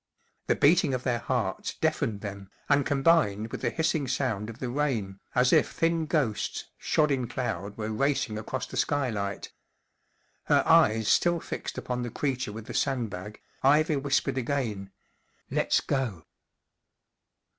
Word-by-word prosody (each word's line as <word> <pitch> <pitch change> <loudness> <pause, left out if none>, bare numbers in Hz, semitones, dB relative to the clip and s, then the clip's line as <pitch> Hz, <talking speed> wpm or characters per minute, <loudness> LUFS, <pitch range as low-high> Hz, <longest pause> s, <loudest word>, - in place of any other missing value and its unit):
The - - +3
beating 150 -2 +4
of 125 - -4
their 120 -2 0
hearts 115 -7 -2
deafened 105 -2 -1
them, 100 -2 -7 0.2
and 140 -1 +3
combined 135 -8 +2
with - - -5
the - - +1
hissing 160 -3 0
sound 115 -5 -1
of 115 - -8
the 130 - -4
rain, 120 -9 -1 0.2
as 125 0 +4
if - - +4
thin 165 -1 0
ghosts 135 -10 -1
shod 150 -1 +2
in 130 -3 0
cloud 115 -4 -4
were 110 0 -3
racing 120 -2 0
across 110 - -4
the - - -8
skylight. 110 -9 -1 0.9
Her - - +4
eyes 110 0 +4
still 175 +7 +3
fixed - - -6
upon 125 -1 -3
the 120 - -3
creature 130 -2 -2
with 110 +1 -8
the - - -7
sandbag, 105 -7 -2 0.2
Ivy 150 +2 +4
whispered 135 -1 0
again: 115 -7 -2 0.6
44 - - -5
Let's - - +2
go." 120 - -2
125 Hz, 150 wpm, -28 LUFS, 105-140 Hz, 0.9 s, beating